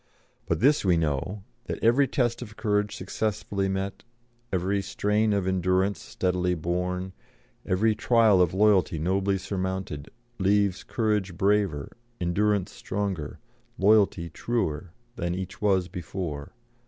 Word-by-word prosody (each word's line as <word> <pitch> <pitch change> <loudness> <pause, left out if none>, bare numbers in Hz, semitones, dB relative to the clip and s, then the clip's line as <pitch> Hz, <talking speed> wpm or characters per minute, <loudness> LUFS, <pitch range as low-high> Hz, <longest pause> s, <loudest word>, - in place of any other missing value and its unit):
But - - 0
this 145 +4 +4
we 90 -3 +3
know 80 +6 -1 0.2
that - - -3
every 125 +5 +5
test 120 -4 0
of 110 -3 -9
courage 105 -2 0
successfully 100 -2 -2
met, 95 +1 -3 0.5
every 95 +2 0
strain 105 +2 +1
of 100 -2 +1
endurance 95 0 +1
steadily 90 -1 -1
borne, 90 +3 -2 0.5
every 110 +4 +3
trial 110 -4 +4
of 90 -2 +3
loyalty 95 -4 +3
nobly 95 +4 +1
surmounted, 95 -6 -4 0.3
leaves 100 0 +2
courage 105 -6 -1
braver, 100 -7 +1 0.3
endurance 100 +2 +1
stronger, 95 -6 -4 0.4
loyalty 100 -4 +4
truer, 90 -8 -2 0.3
than 85 0 -1
each 95 +1 -6
was 95 -4 +2
before. 85 -4 -5
95 Hz, 120 wpm, -27 LUFS, 90-105 Hz, 0.5 s, every